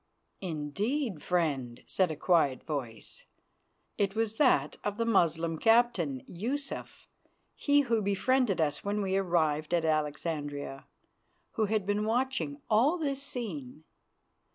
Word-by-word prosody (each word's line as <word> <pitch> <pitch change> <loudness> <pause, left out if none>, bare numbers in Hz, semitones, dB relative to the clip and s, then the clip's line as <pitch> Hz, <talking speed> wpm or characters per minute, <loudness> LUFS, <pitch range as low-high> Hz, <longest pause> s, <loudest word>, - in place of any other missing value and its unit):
"Indeed, 190 - -2
friend," 140 -10 -1
said 185 -2 +1
a 155 - -3
quiet 155 -4 +2
voice. 130 -8 -5 0.7
It 200 0 +1
was 220 -1 -1
that 155 - +3
of 205 0 -2
the 230 - 0
Moslem 165 -6 +2
captain, 225 - +3
Yusuf, 260 +10 -5 0.5
he 285 0 +3
who 230 -5 +1
befriended 205 +2 +1
us 145 -2 0
when 205 +1 -1
we 190 0 0
arrived 165 -4 +1
at 165 -1 +1
Alexandria, 150 -2 -2 0.6
who 220 - 0
had 210 -1 0
been 205 +1 0
watching 260 +5 -1
all 245 +11 +4
this 280 -4 -1
scene. 170 - -5
190 Hz, 125 wpm, -30 LUFS, 155-230 Hz, 0.7 s, all